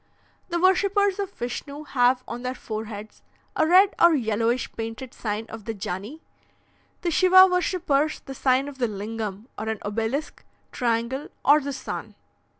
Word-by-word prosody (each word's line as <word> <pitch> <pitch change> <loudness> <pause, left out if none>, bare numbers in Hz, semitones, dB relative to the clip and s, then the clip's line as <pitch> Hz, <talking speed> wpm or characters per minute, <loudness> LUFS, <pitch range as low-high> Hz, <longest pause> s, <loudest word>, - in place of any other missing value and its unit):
"The 345 0 -1
worshippers 395 +2 +3
of 395 -2 -2
Vishnu 280 +2 -6
have 250 -2 +2
on 235 +1 -6
their 255 +1 -3
foreheads 215 -2 -7 0.3
a 315 - +2
red 380 +4 +6
or 340 -1 +7
yellowish 230 0 0
painted 225 +3 -6
sign 215 0 -3
of 225 -2 -9
the 225 - -4
Jani; 200 - -6 0.8
the 345 - -1
Shiva 370 +3 +7
worshippers, 355 -5 +1
the 270 - -8
sign 265 +1 +2
of 280 -2 -9
the 245 - +2
Lingam, 210 0 -5
or 220 +1 -3
an 220 - -2
obelisk, 225 +8 -3 0.3
triangle, 240 +3 -1 0.2
or 290 +2 +7
the 280 +1 -4
sun. 265 -1 -6
255 Hz, 150 wpm, -25 LUFS, 225-315 Hz, 0.8 s, or